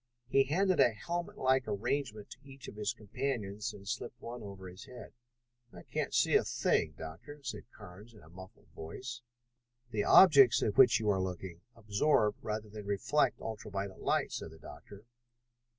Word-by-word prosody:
He 135 +1 +4
handed 185 +6 +1
a 120 - +5
helmetlike 130 -5 -1
arrangement 110 +1 -3
to - - -9
each 135 -1 -12
of - - -9
his 105 0 -1
companions 110 -2 -4
and 100 -2 -13
slipped 120 - -5
one 120 0 -8
on 105 - -8
over 95 -1 -9
his 90 +3 -11
head. 125 - -11 0.6
"I 90 - -12
can't - - -3
see - - +2
a - - +5
thing, 75 -2 0
Doctor," 85 - -9
said 125 - -6
Carnes 105 +6 -13
in 105 - -16
a 80 - -17
muffled 95 +2 -14
voice. 120 +9 -7 0.7
"The 105 -2 0
objects 140 - +7
at 105 - 0
which 125 -2 +6
you 105 -2 +1
are 95 -1 0
looking 90 -2 -5
absorb 105 +1 +2
rather 110 0 -3
than 105 -1 -9
reflect 115 +7 +1
ultra 110 -1 -6
violet 100 -1 -5
light," - - 0
said - - -5
the 80 - -14
doctor. 100 +5 -13
105 Hz, 175 wpm, -32 LUFS, 100-130 Hz, 0.7 s, objects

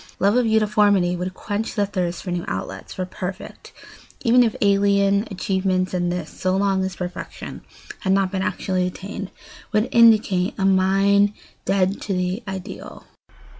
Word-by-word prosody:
Love 200 +3 +2
of 250 -2 +3
uniformity 210 -4 +3
would 180 +1 -4
quench 215 +2 -4
the 205 -2 +2
thirst 180 -3 -3
for 180 - -4
new 175 -1 -2
outlets, 95 +1 -5
for 185 - -3
perfect, 185 +1 -7 0.5
even 245 0 +5
if 230 -3 +2
alien, 200 0 +3
achievements, 185 -1 -1
and 175 -1 0
this, 175 -3 -4
so 185 0 -1
long 195 -1 +1
as 190 0 -3
perfection 180 0 -7 0.4
had 190 - -1
not 195 -1 +1
been 190 -1 -2
actually 185 -1 -1
attained, 195 +1 -6 0.4
would 215 +2 +2
indicate 215 -5 +4
a 195 - 0
mind 195 +2 +3 0.3
dead 195 0 +1
to 200 - -3
the 180 +3 -1
ideal. 190 +1 -7
195 Hz, 155 wpm, -22 LUFS, 185-205 Hz, 0.5 s, even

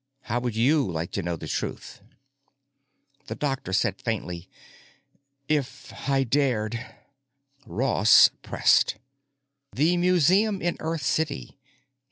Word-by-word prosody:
How 120 +1 -2
would 120 -2 -3
you 130 - +2
like 80 +1 -4
to 100 - -2
know 85 -1 -3
the - - -8
truth?" - - -5 1.3
The - - -5
doctor 135 -9 -3
said 95 - 0
faintly, 90 -7 -4 1.0
"If 145 -3 -2 0.2
I 135 -1 +3
dared——" 120 -4 0 0.8
Ross 105 0 +5
pressed, - - +2 0.7
"The 160 +6 +2
museum 185 +4 +3
in 175 -1 -1
Earth 160 -2 -3
city. 145 0 -2
135 Hz, 110 wpm, -25 LUFS, 110-155 Hz, 1.3 s, Ross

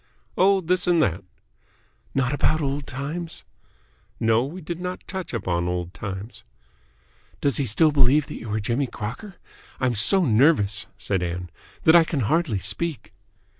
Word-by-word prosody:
"Oh, 195 +1 +4
this 180 +1 +1
and 175 -2 +4
that." 95 +1 -1 0.9
"Not 135 0 +1
about 155 +2 +2
old 140 -1 -2
times?" 155 +6 -5 0.8
"No, 115 +1 +3
we 155 +8 -6
did 170 0 -6
not 180 0 -5
touch 190 -2 -5
upon 90 -7 -1
old 90 0 -3
times." 100 +4 -7 1.0
"Does 140 - +1
he 140 - 0
still 155 +9 +3
believe 140 +1 +4
that - - -8
you 115 - -7
are 110 - 0
Jimmy 120 +6 -1
Crocker? 125 - -7 0.4
I'm 130 -2 +1
so 170 - +5
nervous," 110 -4 +3
said 95 -3 -1
Ann, 90 0 -4 0.3
"that 160 - +6
I 170 - +8
can 155 -4 -2
hardly 150 -1 +1
speak." 130 - -2
135 Hz, 155 wpm, -24 LUFS, 105-165 Hz, 1.0 s, I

